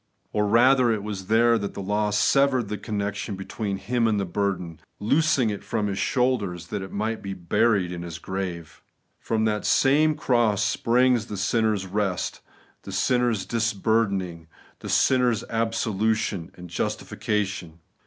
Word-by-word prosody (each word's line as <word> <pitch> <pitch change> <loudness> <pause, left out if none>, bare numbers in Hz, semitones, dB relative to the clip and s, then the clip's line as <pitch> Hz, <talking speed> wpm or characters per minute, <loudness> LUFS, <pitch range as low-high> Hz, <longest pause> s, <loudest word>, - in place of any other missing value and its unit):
Or 105 0 +1
rather, 125 +3 +5
it 105 -3 -1
was 100 -3 -5
there 115 +1 +4
that 100 -1 -5
the - - -6
law 105 +2 0
severed 125 +3 +2
the 105 - -3
connection 105 -1 -3
between 100 +1 -4
Him 115 +4 0
and 105 -2 +1
the 100 - -1
burden; 90 -3 -2 0.2
loosing 135 0 +2
it 100 - -6
from 110 -2 -2
His 100 -1 -2
shoulders, 105 -10 0
that 105 -2 -3
it 95 - -7
might 110 +2 -2
be 100 -1 -5
buried 90 +1 +1
in 85 -1 -5
His 85 -2 -6
grave. 90 -4 -5 0.4
From 110 -1 0
that 105 -1 0
same 150 +3 +3
cross 120 -8 +2
springs 120 0 +2
the 105 - -5
sinner's 105 0 +1
rest, 95 -1 -2 0.4
the - - -9
sinner's 120 -4 +1
disburdening, 100 -6 0 0.3
the - - -7
sin 130 -1 +3
ner's 120 -4 +1
absolution 110 -4 -1
and 90 0 -10
justification. 95 -1 -3
105 Hz, 155 wpm, -25 LUFS, 95-115 Hz, 0.4 s, rather